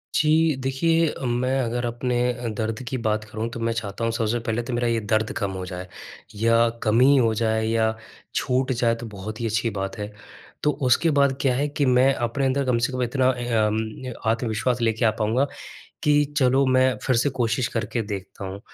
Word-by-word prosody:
जी 155 0 +3
देखिए, 160 +5 +1
मैं 125 +2 0
अगर 120 -1 -1
अपने 120 +1 -1 0.2
अ, 120 0 -6
दर्द 110 +2 -3
की 130 - -2
बात 110 0 +1
करूँ 110 +2 -4
तो 115 - -7
मैं 115 0 0
चाहता 105 0 -4
हूँ 115 - +1
सबसे 115 0 0
पहले 115 0 -2
तो 120 +1 -5
मेरा 120 0 0
ये 115 -1 +1
दर्द 110 +1 0
कम 100 -4 -1
हो 95 -1 -5
जाए 90 0 -7 0.5
या 115 +2 +3 0.2
कम 110 +1 +3
ही 140 +2 +6
हो 115 -3 +3
जाए 110 0 +1
या 110 -1 +1 0.4
छूट 130 +1 +1
जाए, 115 -2 +1
तो 115 0 -8
बहुत 105 +1 -7
ही - - -1
अच्छी 115 +1 0
बात 95 -2 -4
है। 105 0 -5 0.5
तो 150 - +3 0.2
उसके 165 +7 +4
बाद 140 -2 +3
क्या 130 -3 +2
है 145 +3 0
कि 145 0 0
मैं 130 +1 +4
अपने 120 +3 -1
अंदर 135 +1 +1
कम 125 -2 +2
से 120 - 0
कम 130 - -2
इतना 130 +1 +2 0.4
अम 110 +4 -3 0.2
आत्मविश्वास 115 +1 -1
लेके 115 +1 +1
आ 110 - +5
पाऊँगा 115 +6 +2 0.6
कि 145 0 +4
चलो 135 0 +4
मैं 130 0 +3
फ़िर 130 - +1
से 135 +4 +2
कोशिश 115 +1 +1
कर 115 - 0
के 115 - 0
देखता 100 -2 -7
हूँ। 95 +1 -6
120 Hz, 210 wpm, -24 LUFS, 110-130 Hz, 0.6 s, ही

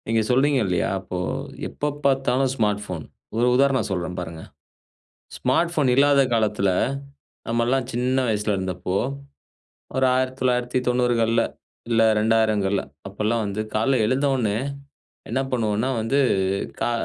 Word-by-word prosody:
நீங்க 115 0 +2
சொல்றீங்க 135 +2 +3
இல்லையா? 90 -3 0
அப்போ 95 -1 -6 0.5
எப்பப்பாத்தாலும் 135 -2 0
ஸ்மார்ட் 105 -3 0
போன்! 85 -4 -5 0.3
ஒரு 120 +2 +3
உதாரணம் 135 -2 +2
சொல்றேன் 90 -1 -3
பாருங்க. 80 -2 -6 1.0
ஸ்மார்ட் 170 0 +1
ஃபோன் 145 -5 +2
இல்லாத 140 +1 +5
காலத்தில, 105 -3 +1 0.8
நம்மலாம் 120 +2 +1
சின்ன 125 +2 0
வயசில 105 -1 0
இருந்தப்போ, 95 0 -3 1.0
ஒரு 130 0 +3
1990கள்ல, 125 -2 +1 0.5
இல்ல 115 -1 +3 0.2
2000கள்ல 110 -3 +2 0.3
அப்போலாம் 110 +2 -1
வந்து 100 +1 -3
கால்ல 120 +4 +2
எழுந்த 130 +5 +1
உடனே, 110 -5 0 0.7
என்ன 125 +4 0
பண்ணுவோம்னா 110 0 0
வந்து, 130 +6 +1 0.6
கா - - +1
115 Hz, 115 wpm, -23 LUFS, 105-130 Hz, 1.0 s, இல்லாத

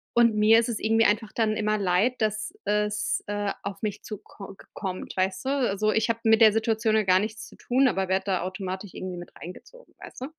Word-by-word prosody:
und 235 -1 +5
mir 215 +1 +5
isses 230 -1 -2
irgendwie 225 +1 +2
einfach 215 +1 +1
dann 220 -2 +1
immer 215 0 0
leid, 200 +5 +1
dass 215 0 -1
es, 210 0 0
äh, 205 -1 -2
auf 200 0 -6
mich 210 0 -3
zuko 200 -2 -10
gekommt, 185 0 -7
weißt 185 +5 -1
du? - - 0
Also, 215 -7 +1
ich 220 +1 +1
habe 230 0 -1
mit 220 0 +5
der 220 -1 +8
Situation 220 0 +1
ja 220 - +3
gar 185 -1 +4
nichts 215 +2 -5
zu - - -16
tun, 260 +2 +2
aber 195 -5 0
werde 190 0 0
da 190 -3 0
automatisch 185 +1 -5
irgendwie 185 -1 -6
mit 175 0 -9
reingezogen, - - -12
weißt - - -12
du? - - -3
210 Hz, 215 wpm, -26 LUFS, 195-225 Hz, -, der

